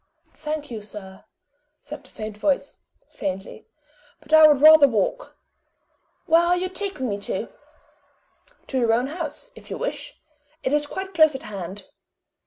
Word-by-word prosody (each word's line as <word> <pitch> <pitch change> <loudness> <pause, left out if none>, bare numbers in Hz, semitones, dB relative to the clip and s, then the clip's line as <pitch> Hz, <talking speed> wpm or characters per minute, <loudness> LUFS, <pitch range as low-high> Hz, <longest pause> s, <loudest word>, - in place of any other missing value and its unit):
"Thank 300 -2 -5
you, 220 -2 -5
sir," 200 -2 -11 0.5
said 300 +1 -10
the - - -19
faint 215 -1 -7
voice, 275 +7 -1 0.3
faintly; 195 +2 -6 0.5
"but 305 0 -9
I 315 0 +9
would 295 -3 +4
rather 310 -1 +9
walk. 265 - -2 0.9
Where 330 -1 +5
are 350 +1 +2
you 370 +1 -2
taking 380 -8 -3
me 205 -2 -3
to?" 200 - -4 1.2
"To 265 - -2
your 230 -2 +3
own 240 +2 +2
house, 335 - -6
if - - -14
you - - -4
wish - - -5 0.4
it 260 - 0
is 295 0 +1
quite 380 +4 -6
close 315 -3 +5
at 265 - -6
hand." 195 -1 -7
290 Hz, 155 wpm, -23 LUFS, 215-315 Hz, 1.2 s, I